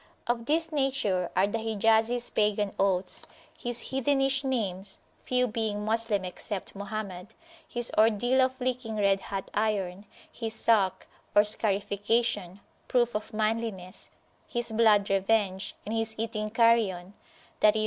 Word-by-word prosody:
Of 235 -1 -1
this 325 +2 +1
nature 265 - 0
are 185 - +4
the 205 +3 -2
Hijazis 225 +2 +1
pagan 210 -1 +1
oaths, 185 -2 0 0.3
his 240 -1 -4
heathenish 270 +1 +1
names 200 -7 -2 0.3
(few 250 0 +2
being 215 -3 -2
Moslem 220 -3 0
except 190 +2 -5
Mohammed), 200 0 -6 0.3
his 240 0 -1
ordeal 230 +4 +4
of 260 +1 +1
licking 250 -3 -2
red 200 -2 +3
hot 195 -1 -6
iron, 205 -2 -1 0.2
his 225 -2 -3
Salkh, 205 -6 +2 0.3
or 205 - +8
scarification, 205 -1 0 0.3
proof 240 -1 +2
of 210 +1 -4
manliness, 215 -4 -3 0.4
his 240 -1 -2
blood 215 -3 +4
revenge, 195 -1 +1
and 215 - -4
his 225 -1 -1
eating 215 -1 -2
carrion 215 -5 +2 0.5
(i.e. 210 -1 +6
215 Hz, 130 wpm, -28 LUFS, 200-235 Hz, 0.5 s, or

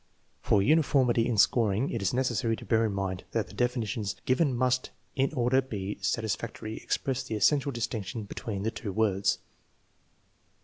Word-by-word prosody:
For 100 - +3
uniformity 130 -5 +3
in 120 -3 0
scoring 110 +3 +3
it 115 - -2
is 100 - +1
necessary 120 -3 0
to - - -11
bear 115 -1 +3
in - - -2
mind 95 -2 -3
that 115 -2 -1
the - - -12
definitions 115 -4 -1
given 130 0 +2
must, 125 0 +1 0.3
in 135 -1 +1
order 125 +1 +3
to 130 - -17
be 100 -4 -4
satisfactory, 110 +2 -2
express 130 -1 -1
the 110 - -4
essential 140 +6 +3
distinction 115 -3 -3
between 100 0 -5
the 110 - 0
two 110 -2 -5
words. 100 -2 +1
115 Hz, 165 wpm, -29 LUFS, 105-125 Hz, 0.3 s, For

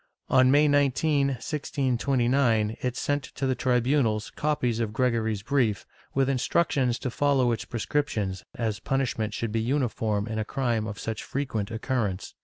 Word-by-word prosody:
^ - - +2
On 130 0 +6
May 145 +3 +5
19, 145 0 +2
1629, 130 -4 0
it 125 -1 -2
sent 145 0 0
to 135 - -2
the 130 - +2
tribunals 125 -3 +1
copies 125 -6 0
of 110 -2 -2
Gregory's 115 -4 0
brief, 125 -6 +1 0.3
with 135 -1 +3
instructions 130 -1 +1
to 125 - -4
follow 135 -2 +2
its 115 - -2
prescriptions, 110 -6 -2
as 110 -6 -2
punishment 115 -4 -1
should 115 -2 -2
be 115 +1 0
uniform 115 -5 0
in 110 -1 -3
a - - 0
crime 115 -2 -1
of 105 -2 -6
such 110 +1 -4
frequent 115 -7 -3
occurrence. 110 -4 -2
125 Hz, 155 wpm, -27 LUFS, 110-135 Hz, 0.3 s, On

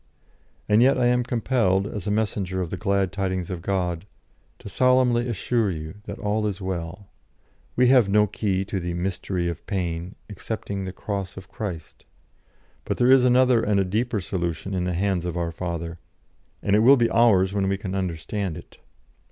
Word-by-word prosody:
And 105 +2 +4
yet 130 +2 +5
I 125 - +2
am 125 0 +3
compelled, 115 -6 +1
as 105 -1 -5
a - - +1
messenger 100 -3 -1
of 90 -3 -3
the - - -2
glad 100 -1 0
tidings 95 -2 -2
of 90 -2 -4
God, 90 -1 -2 0.5
to - - -12
solemnly 125 +1 +3
assure 115 0 0
you 80 -3 -5
that 100 +1 -6
all 105 0 -1
is 100 -2 -3
well. 95 +1 -5 0.6
We 125 0 +4
have 125 -6 +5
no 105 +1 +4
key 95 -2 -1
to 95 0 -3
the 85 -1 -4
'mystery 90 0 -2
of 85 -2 -5
pain' 90 -2 -3
excepting 100 -2 -5
the 95 - -4
Cross 100 0 -5
of 95 -1 -10
Christ. 90 -8 -7 0.8
But - - -3
there 125 +1 +4
is 130 -1 +6
another 125 -1 +4
and 105 -2 +1
a 95 - +2
deeper 110 +4 -1
solution 90 +1 -3
in 90 -1 -1
the 90 - -1
hands 95 -1 0
of 90 -1 -3
our 85 -1 -1
Father; 85 -1 -5 0.6
and 100 - +2
it - - +5
will 130 +5 +7
be 115 -2 +2
ours 100 -5 +4
when 100 -1 0
we 100 - 0
can 95 -2 -5
understand 95 0 -3
it. - - -14
100 Hz, 185 wpm, -24 LUFS, 90-110 Hz, 0.8 s, will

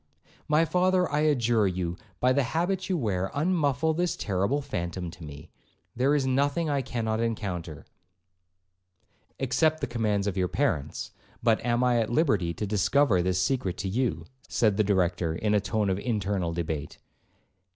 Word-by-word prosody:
'My 155 +2 +3
father, 180 +2 +2
I 145 - +1
adjure 120 -8 +2
you, 90 -2 -2 0.2
by 125 +1 +3
the 140 - +3
habit 175 +9 -1
you 185 - +1
wear, 95 - -1
unmuffle 155 -2 +1
this 175 +1 0
terrible 100 +8 0
phantom 85 - -4
to 85 - -12
me; 75 -2 -10 0.4
there 135 +4 +2
is 140 -2 +1
nothing 140 +4 +1
I 140 -1 +1
cannot 115 -3 -2
encounter'—'Except 90 - -5
the - - -1
commands 110 -4 -1
of 100 -2 -1
your 90 -1 +1
parents. 95 - -2 0.3
But 115 -2 +2
am 120 +1 +1
I 125 -1 +3
at 110 - 0
liberty 110 - +2
to 85 +6 -4
discover 105 +1 +2
this 90 +1 0
secret 125 -4 0
to 100 - -3
you?' 120 +5 -1 0.2
said 110 -4 +2
the 105 - +3
Director, 90 -4 +1
in 105 +4 0
a 105 - +4
tone 105 +2 -1
of 95 0 0
internal 100 -6 -1
debate. 80 -3 -4
110 Hz, 160 wpm, -27 LUFS, 90-140 Hz, 0.4 s, a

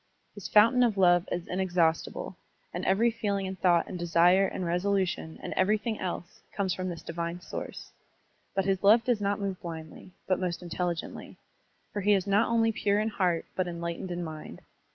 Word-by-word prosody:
His 205 - -7
fountain 230 +4 +5
of 230 -5 +3
love 175 -2 +4
is 175 -1 -2
inexhaustible, 180 -1 0 0.4
and 175 - -4
every 225 +5 +3
feeling 205 -4 -2
and 190 -1 -5
thought 175 -2 +3
and 180 - -6
desire 175 +3 +4
and 185 - -4
resolution 180 -2 -1
and - - -4
everything 215 +3 +1
else 175 -1 -5
comes 190 -2 -1
from 185 0 -3
this 170 -2 -7
divine 170 +1 -4
source; 180 - -7 0.6
but 195 -1 +1
his 195 -1 +1
love 220 +4 +6
does 235 -3 +1
not 200 0 0
move 195 -2 -3
blindly, 160 +1 -8 0.2
but 185 - +1
most 180 -1 -3
intelligently, 175 -1 -4 0.6
for 205 - -2
he 205 +2 +4
is 195 -2 +1
not 205 +3 +3
only 225 -1 +3
pure 205 -2 +1
in 215 +1 0
heart 180 -5 0
but 185 -1 0
enlightened 170 +1 -4
in 175 0 -3
mind. 155 -2 -8
185 Hz, 180 wpm, -29 LUFS, 175-205 Hz, 0.6 s, love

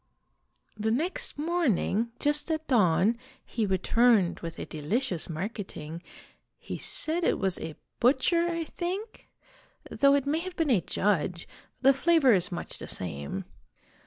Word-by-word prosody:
"The 215 +1 -1
next 310 +11 0
morning, 290 - +1
just 295 +2 +1
at 315 -1 -1
dawn, 210 - +3 0.3
he 220 -3 -2
returned 195 0 +3
with 165 -1 -7
a - - -5
delicious 175 - -2
marketing, 170 -3 -6 0.6
he - - -7
said 330 +3 -1
it - - +2
was 190 -3 -1
a 160 - -6 0.2
butcher, 295 +7 +3
I 335 -1 -2
think, 375 +7 -5 0.6
though 280 0 +4
it 280 -1 0
may 300 +3 +1
have 365 +1 -6
been 325 -5 +1
a 205 -7 +4
judge; 175 -2 -1 0.4
the 270 +1 +7
flavor 295 -3 +4
is 185 0 +2
much 175 - -5
the - - -7
same. 70 -6 -2
235 Hz, 140 wpm, -28 LUFS, -, 0.6 s, the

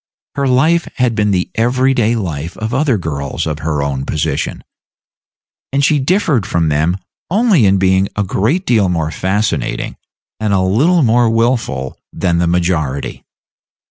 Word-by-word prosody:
Her 140 0 -1
life 155 +7 +2
had 125 -2 +1
been 105 -1 +1
the 90 -3 0
every 130 +3 +2
day 120 -2 +1
life 85 -6 -4
of 110 +2 -4
other 135 -3 +2
girls 70 -6 -3
of 75 -1 -3
her 75 -2 -1
own 70 -2 -2
position, 75 0 -2 1.1
and 140 +1 +2
she 150 -1 +3
differed 145 - +1
from 85 -3 0
them 80 +5 +1 0.3
only 195 - +3
in 95 +1 +3
being 95 0 +2
a 105 - 0
great 115 - 0
deal 105 -6 +2
more 80 -3 -1
fascinating, 100 +6 -2 0.4
and 105 -2 0
a 95 - +3
little 140 - +3
more 120 0 +3
wilful, 115 - -1
than 85 -3 0
the 85 - +1
majority. 85 -6 -1
105 Hz, 155 wpm, -16 LUFS, 85-130 Hz, 1.1 s, she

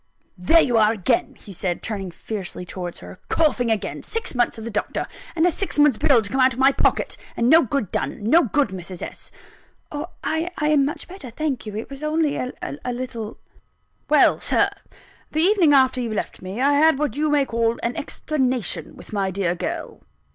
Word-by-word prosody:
"There 255 - +5
you 245 -7 +3
are 215 -1 +5
again!" 225 +3 0
he 200 - -12
said, 180 0 -3
turning 200 -4 -4
fiercely 185 0 -6
towards 175 -1 -6
her 90 +1 -11
"Coughing 255 -7 +2
again! 220 -2 -2
Six 455 +1 -4
months 240 -2 +1
of 220 - -7
the 230 - -5
doctor 210 - -2 0.3
a 345 +2 +3
six 390 0 -3
months' 290 -6 +4
bill 275 -7 +4
to 205 - -3
come 265 +1 +1
out 255 0 +5
of - - -10
my 270 +1 +6
pocket - - 0 0.2
and 235 - +2
no 320 +5 +7
good 260 - -2
done 135 +9 -3
no 310 +11 +5
good, 275 +1 +1
Mrs. 185 -1 -7
S." - - -7 0.6
"Oh, 295 +3 -4 0.2
I 320 +2 -1
am 300 -2 +3
much 295 - -4
better, 355 -8 -9
thank 270 -1 -3
you 210 - -6
it 225 - -6
was 275 +1 -8
only 305 -1 +1
a 255 - -3 0.4
little 240 -3 -5 0.4
" - - -44
"Well, - - +5
Sir, - - +2 0.6
the 310 - +2
evening 370 -5 +5
after 260 -2 +4
you 235 -2 -3
left 215 - -4
me, 185 +5 -6
I 280 +2 +3
had 310 0 +5
what 300 0 -1
you 305 +1 0
may 290 -2 +3
call 230 -1 0
an 235 - -1
explanation 260 - -2
with - - -13
my 195 -2 0
dear 185 -2 0
girl. 180 - -5
255 Hz, 200 wpm, -22 LUFS, 210-300 Hz, 0.6 s, no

